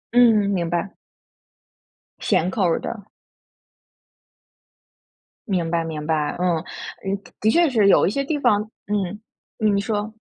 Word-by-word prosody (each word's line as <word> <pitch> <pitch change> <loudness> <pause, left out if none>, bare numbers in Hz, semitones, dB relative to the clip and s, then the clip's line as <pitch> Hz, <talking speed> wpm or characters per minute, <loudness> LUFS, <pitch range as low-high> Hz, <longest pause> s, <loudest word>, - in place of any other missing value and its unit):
嗯， 225 -4 +5
明 170 -3 -1
白。 175 +3 -2 1.2
咸 185 -3 +1
口 195 +1 -1
儿 170 -2 +2
的。 210 -4 -6 2.4
明 180 -5 0
白 165 -1 0
明 155 -2 -5
白， 155 -2 0
嗯。 180 -2 +2
呃， 190 +3 -6 0.3
的 215 - +3
确 340 +2 +4
是 220 -6 +3
有 - - +5
一 - - +2
些 275 +6 -1
地 295 +2 -1
方 225 -6 +3 0.3
嗯， 205 -1 -2 0.4
嗯， 215 -2 +2
你 200 - +1
说。 210 0 -2
200 Hz, 145 characters per minute, -22 LUFS, 175-215 Hz, 2.4 s, 嗯